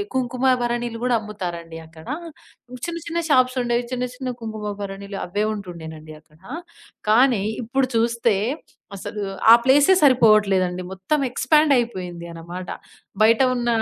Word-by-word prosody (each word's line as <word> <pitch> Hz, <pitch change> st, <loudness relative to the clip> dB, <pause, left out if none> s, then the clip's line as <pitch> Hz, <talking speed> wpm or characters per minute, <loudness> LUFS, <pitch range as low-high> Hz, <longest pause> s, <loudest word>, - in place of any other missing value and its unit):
కుంకుమ 255 Hz, 0 st, +1 dB
భరణిలు 240 Hz, -1 st, -2 dB
గూడా 250 Hz, -1 st, +2 dB
అమ్ముతారండి 175 Hz, -6 st, -6 dB
అక్కడ. 160 Hz, 0 st, -15 dB, 0.8 s
చిన్న 335 Hz, 0 st, -4 dB
చిన్న 335 Hz, 0 st, -2 dB
షాప్స్ 255 Hz, -2 st, +3 dB
ఉండేవి. 240 Hz, 0 st, 0 dB
చిన్న 250 Hz, 0 st, -1 dB
చిన్న 260 Hz, 0 st, -4 dB
కుంకుమ 215 Hz, -2 st, -5 dB
భరణిలు 200 Hz, 0 st, -6 dB
అవ్వే 205 Hz, +4 st, -1 dB
ఉంటుండేనండి 160 Hz, -6 st, -8 dB
అక్కడ. 155 Hz, -1 st, -26 dB, 0.7 s
కానీ 240 Hz, -3 st, +4 dB, 0.2 s
ఇప్పుడు 260 Hz, +3 st, 0 dB
చూస్తే 230 Hz, -2 st, +2 dB, 0.6 s
అసలు 205 Hz, +2 st, -5 dB, 0.3 s
ఆ -, -, +11 dB
ప్లేసే 285 Hz, +7 st, +5 dB
సరిపోవట్లేదండి. 210 Hz, -9 st, +4 dB
మొత్తం 190 Hz, +11 st, -1 dB
ఎక్స్‌పాండ్ 300 Hz, +4 st, +3 dB
అయిపోయింది 185 Hz, -8 st, -3 dB
అన్నమాట. 175 Hz, +2 st, -8 dB, 0.5 s
బయట 225 Hz, +3 st, +5 dB
ఉన్న 240 Hz, -1 st, -2 dB
220 Hz, 125 wpm, -22 LUFS, 185-250 Hz, 0.8 s, ఆ